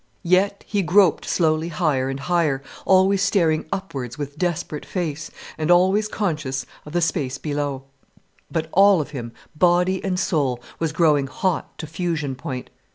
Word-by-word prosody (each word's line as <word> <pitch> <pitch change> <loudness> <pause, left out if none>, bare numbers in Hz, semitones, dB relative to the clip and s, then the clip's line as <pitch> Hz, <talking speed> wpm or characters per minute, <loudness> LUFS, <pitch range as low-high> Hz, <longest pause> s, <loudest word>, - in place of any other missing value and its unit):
Yet 190 +3 +2
he 205 -2 0
groped 185 -1 +4
slowly 160 -1 +1
higher 150 -5 0
and 135 +1 -4
higher, 155 -5 +1 0.2
always 190 +1 +4
staring 160 -6 +2
upwards 135 -11 -4
with 145 -1 -5
desperate 165 -2 -2
face, 160 -4 -4 0.3
and 155 +1 -1
always 190 +4 +4
conscious 150 - -2 0.2
of 150 - -9
the 175 - +1
space 145 -6 -1
below. 145 -2 -3 0.7
But 160 -1 -2
all 195 -1 +6
of 150 -1 -4
him, 120 -5 -6 0.2
body 180 +3 +2
and 185 -2 -1
soul, 140 -10 0 0.2
was 165 -2 0
growing 150 -4 +3
hot 175 +6 -2
to - - -6
fusion 160 -3 -2
point. 130 -1 -6
160 Hz, 155 wpm, -22 LUFS, 145-180 Hz, 0.7 s, all